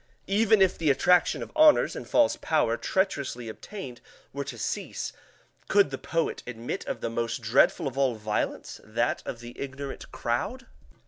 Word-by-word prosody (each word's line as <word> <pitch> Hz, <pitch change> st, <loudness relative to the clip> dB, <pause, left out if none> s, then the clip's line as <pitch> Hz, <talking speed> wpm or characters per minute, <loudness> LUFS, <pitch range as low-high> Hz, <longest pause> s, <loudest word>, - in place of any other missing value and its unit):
Even 210 Hz, 0 st, +4 dB
if 185 Hz, -, +1 dB
the 160 Hz, -3 st, +2 dB
attraction 175 Hz, +6 st, +3 dB
of -, -, -10 dB
honors 310 Hz, -1 st, +6 dB
and -, -, -7 dB
false 295 Hz, -1 st, +4 dB
power 150 Hz, -7 st, +2 dB
treacherously 140 Hz, -, -1 dB
obtained 125 Hz, -, -8 dB, 0.3 s
were 140 Hz, +1 st, -3 dB
to -, -, -7 dB
cease, -, -, -3 dB, 0.5 s
could 200 Hz, -8 st, +4 dB
the 135 Hz, -, -4 dB
poet 165 Hz, -1 st, -1 dB
admit 120 Hz, -1 st, -4 dB
of -, -, -4 dB
the -, -, -2 dB
most 115 Hz, 0 st, -2 dB
dreadful 115 Hz, +5 st, +3 dB
of 135 Hz, 0 st, -4 dB
all 130 Hz, -3 st, +2 dB
violence, 105 Hz, -1 st, -3 dB
that 115 Hz, +3 st, -1 dB
of 120 Hz, -, -5 dB
the 120 Hz, 0 st, -9 dB
ignorant 140 Hz, 0 st, -6 dB
crowd? -, -, -2 dB
135 Hz, 165 wpm, -27 LUFS, 120-180 Hz, 0.5 s, honors